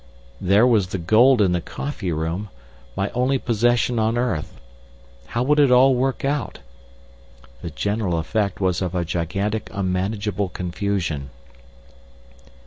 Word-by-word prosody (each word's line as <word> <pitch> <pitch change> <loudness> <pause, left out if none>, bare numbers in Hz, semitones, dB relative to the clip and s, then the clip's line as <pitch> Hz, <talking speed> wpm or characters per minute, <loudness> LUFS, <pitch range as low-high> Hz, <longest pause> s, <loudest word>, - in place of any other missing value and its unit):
There 100 +5 +4
was 110 -7 +3
the 95 - -4
gold 110 +7 +4
in 95 - +2
the 90 -1 0
coffee 110 - -5
room—my 80 -3 -5
only 125 +4 +1
possession 120 0 +1
on 110 +2 +1
earth. 120 -11 -2 0.7
How 120 +1 -1
would 150 +3 +2
it 145 -2 +5
all 130 +2 +6
work 130 +2 -1
out? 140 -2 -2 1.0
The 85 - -5
general 100 +2 -1
effect 100 +4 -1
was 95 -2 0
of 90 -1 -2
a 90 -1 0
gigantic 95 +6 -2
unmanageable 100 +1 -2
confusion. 90 -5 -3
100 Hz, 130 wpm, -22 LUFS, 90-120 Hz, 1.0 s, all